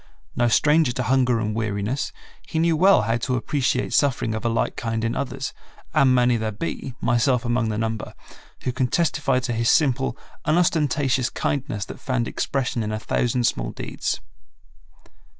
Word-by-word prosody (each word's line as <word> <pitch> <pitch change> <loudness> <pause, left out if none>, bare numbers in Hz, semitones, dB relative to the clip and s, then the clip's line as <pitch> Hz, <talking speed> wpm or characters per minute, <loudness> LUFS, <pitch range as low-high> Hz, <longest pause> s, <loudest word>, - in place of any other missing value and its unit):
No 120 - +2
stranger 150 +4 +4
to 125 - -2
hunger 125 -1 +2
and 110 -1 -1
weariness, 110 +3 -2 0.4
he - - -4
knew 165 0 +3
well 185 - +5
how 115 +2 +1
to 125 +2 -1
appreciate 130 +2 0
suffering 130 -5 +2
of 110 - -4
a 115 - +1
like 115 - 0
kind 115 -1 -2
in 115 - -1
others, 135 0 -3 0.4
and 135 -5 +4
many 125 -1 +3
there 110 -1 -2
be, 125 +2 -5
myself 125 0 +2
among 120 -1 +1
the 105 - -2
number, 110 0 -3 0.5
who 130 - 0
can 130 0 0
testify 145 -3 +1
to 125 -1 -2
his 115 +1 +1
simple, 135 -3 +2 0.3
unostentatious 145 -6 +2
kindness 135 -8 -2
that - - -9
found 125 -3 -1
expression 130 -3 -1
in 105 -1 -2
a 110 - -1
thousand 120 +2 0
small - - 0
deeds. - - -3
125 Hz, 170 wpm, -23 LUFS, 115-135 Hz, 0.5 s, well